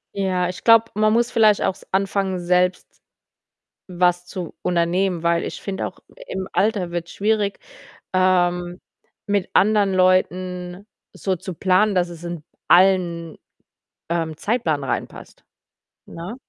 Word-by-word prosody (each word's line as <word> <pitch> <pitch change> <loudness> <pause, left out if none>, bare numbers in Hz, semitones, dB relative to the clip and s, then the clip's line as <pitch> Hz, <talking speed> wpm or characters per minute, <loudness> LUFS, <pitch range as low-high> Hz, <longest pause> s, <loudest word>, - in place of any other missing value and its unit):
Ja, 185 -2 0
ich 180 - -8
glaube, 230 -1 +7
man 215 +1 +2
muss 235 +1 +1
vielleicht 215 -3 +4
auch - - +1
s - - -19
anfangen, 195 -1 0
selbst 180 +1 0 0.9
was 180 -1 +1
zu 180 -2 -7
unternehmen, 175 0 0
weil 170 0 +1
ich - - -6
finde 195 -1 -3
auch, - - -10 0.3
im 190 0 -5
Alter 200 -4 0
wird's 170 0 -5
schwierig, 205 -1 0 0.5
ähm, 180 -1 +1 0.5
mit 205 -2 -1
anderen 205 -1 +3
Leuten 185 0 0 0.3
so 190 -1 -2
zu 180 +1 -8
planen, 190 +4 +2
dass 180 -1 +1
es 170 -1 -11
in 170 -3 -6 0.2
allen, 175 -3 +3 0.7
ähm, 165 -2 -2
Zeitplan 165 - -1
reinpasst, 135 - -5 0.6
ne? 175 +7 -8
185 Hz, 130 wpm, -21 LUFS, 175-195 Hz, 0.9 s, glaube